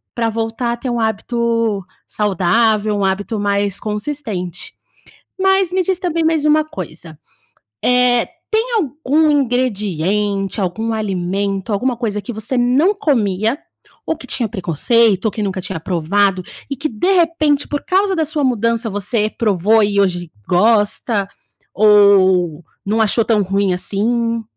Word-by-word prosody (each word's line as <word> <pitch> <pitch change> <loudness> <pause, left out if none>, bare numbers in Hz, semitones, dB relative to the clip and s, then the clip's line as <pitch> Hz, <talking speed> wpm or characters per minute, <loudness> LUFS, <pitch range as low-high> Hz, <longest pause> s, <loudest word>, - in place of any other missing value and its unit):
Pra 230 -1 0
voltar 225 +2 -2
a - - -5
ter 250 +2 -5
um 240 -1 -1
hábito 230 -1 -1 0.2
saudável, 210 +2 +1
um 200 - 0
hábito 205 +3 -2
mais 200 -1 -1
consistente. 215 - -5 0.7
Mas, 385 -1 +2
me 375 0 +2
diz 370 0 -1
também 335 -3 -1
mais 320 -2 +1
uma 305 +1 +4
coisa, 165 - -9 0.7
eh, 250 -1 +3 0.2
tem 455 +3 0
algum 305 - +1
ingrediente, 210 - 0
algum 220 +5 -2
alimento, 195 0 -2
alguma 245 +4 0
coisa 210 -4 -2
que 230 +4 -7
você 220 +4 -4
não 265 +11 +3
comia, 225 - 0 0.5
ou 320 - -2
que 260 - -12
tinha 235 -4 0
preconceito, 200 - +1
ou 220 - +2
que 215 - -5
nunca 190 -2 -3
tinha 180 -2 -5
provado 185 +3 0 0.3
e 275 - -3
que, 295 +4 -3
de 240 - 0
repente, 325 -5 +2
por 290 - -3
causa 385 +1 +2
da 320 -2 0
sua 305 -1 -2
mudança, 230 -2 0
você 210 +2 -1
provou 215 0 +2
e 200 0 +2
hoje 175 -3 -1 0.2
gosta, 205 +1 +1 0.5
ou 190 -5 +4 0.2
não 215 +3 0
achou 220 +1 +2
tão 215 -2 +2
ruim 195 0 0
assim? 230 +5 -1
220 Hz, 145 wpm, -17 LUFS, 200-255 Hz, 0.7 s, uma